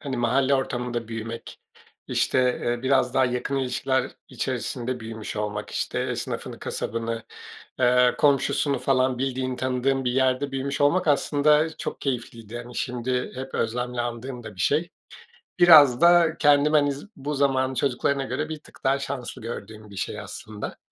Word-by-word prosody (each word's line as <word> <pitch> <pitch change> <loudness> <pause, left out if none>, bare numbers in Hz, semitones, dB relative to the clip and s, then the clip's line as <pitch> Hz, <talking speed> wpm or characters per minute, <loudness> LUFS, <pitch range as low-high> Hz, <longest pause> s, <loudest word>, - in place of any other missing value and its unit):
hani, 135 -3 -4
mahalle 130 +3 +2
ortamında 120 -3 -2
büyümek, 115 0 -7 0.5
işte, - - +1 0.3
eee, 120 0 -1
biraz 130 -1 +2
daha 130 - +4
yakın 125 +2 -1
ilişkiler 130 0 0 0.2
içerisinde 125 0 -3
büyümüş 110 -1 -7
olmak, 105 0 -3
işte, - - -2
esnafını, - - -4
kasabını, 115 0 -3 0.6
ııı, 125 0 +4
komşusunu 140 -1 +2
falan 130 -1 +1
bildiğin, 130 -1 -2
tanıdığım 130 +1 0
bir 125 - +1
yerde 130 +1 +1
büyümüş 135 +1 -3
olmak, 165 +5 +3
aslında, 150 +2 +3
çok - - -5
keyifliydi. 120 -4 -4
Hani, 120 +1 -8
şimdi 125 0 -2
hep 130 +1 -7
özlemle 125 +2 -1
andığım 120 +1 -5
da 110 -2 -9
bir 90 - -9
şey. 160 - +1 0.7
Biraz 150 -7 +8
da 170 -2 +5
kendime, 145 +1 +5
hani, 145 -1 +3
z 140 - -10
bu 145 +2 -4
zamanın 130 -1 +1
çocuklarına 135 +1 0
göre 155 +3 -3
bir 155 -1 -5
tık - - -19
daha 135 0 +2
şanslı 135 -2 -5
gördüğüm 110 -2 -8
bir - - -11
şey, 95 - -3
aslında. 105 -1 -7
130 Hz, 150 wpm, -25 LUFS, 120-140 Hz, 0.7 s, Biraz